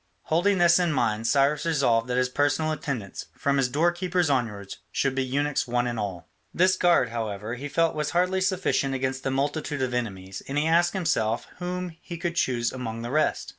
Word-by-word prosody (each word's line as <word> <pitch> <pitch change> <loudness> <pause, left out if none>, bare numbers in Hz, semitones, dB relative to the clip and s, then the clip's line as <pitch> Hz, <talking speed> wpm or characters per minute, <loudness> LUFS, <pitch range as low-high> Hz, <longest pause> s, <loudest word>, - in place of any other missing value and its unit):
Holding 185 +5 +2
this 175 0 +5
in 175 -2 +1
mind, 115 -4 0
Cyrus 140 +3 +2
resolved 130 -8 +2
that 125 0 -1
his 125 0 +3
personal 145 +4 +1
attendants, 135 -10 -4
from 140 0 +1
his 130 -2 +2
doorkeepers 175 +3 +1
onwards, 105 -7 -2
should 135 -1 0
be 135 0 0
eunuchs 140 +2 -1
one 120 0 0
and 120 -2 -2
all. 95 -5 -4 0.2
This 185 +1 +3
guard, 175 -9 +3
however, 110 -1 -4
he 135 +4 -5
felt 165 +2 +2
was 150 -1 -2
hardly 180 +2 +1
sufficient 185 -8 0
against 130 0 -2
the 135 - -2
multitude 145 +1 -1
of 130 -1 -2
enemies, 95 -6 -4
and 135 - -3
he 150 - +2
asked 170 +2 +3
himself 120 - 0
whom 180 0 -3
he 170 - -7
could 170 +1 -3
choose 120 -6 +1
among 115 -3 -5
the 120 - -4
rest. 155 +2 +1
140 Hz, 195 wpm, -26 LUFS, 120-165 Hz, 0.2 s, this